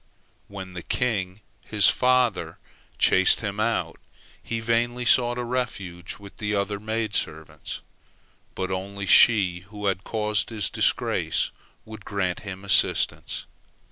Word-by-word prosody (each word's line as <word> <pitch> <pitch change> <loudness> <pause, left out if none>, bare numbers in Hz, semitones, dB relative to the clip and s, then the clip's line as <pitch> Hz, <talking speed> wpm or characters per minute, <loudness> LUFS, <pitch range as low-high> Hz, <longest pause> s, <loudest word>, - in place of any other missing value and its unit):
When 95 -2 -9
the 90 - -6
king, 100 -3 -2 0.2
his 105 -2 +4
father, 125 -4 +2 0.4
chased 95 0 +5
him 100 -1 -4
out, 115 +2 -1 0.4
he 115 - -4
vainly 120 +2 0
sought 120 0 +4
a 125 - -2
refuge 100 -8 -4
with 100 -1 -13
the 105 -1 -2
other 100 0 -1
maid 110 0 -3
servants, 80 -4 -3 0.7
but 95 0 -3
only 100 +1 -4
she 95 -6 +5
who 105 -1 -7
had 95 -1 0
caused 105 -1 -1
his 105 -6 -2
disgrace - - +1 0.3
would 110 -2 -10
grant 95 -4 -2
him 100 -1 -8
assistance. 95 - +2
105 Hz, 130 wpm, -25 LUFS, 95-115 Hz, 0.7 s, chased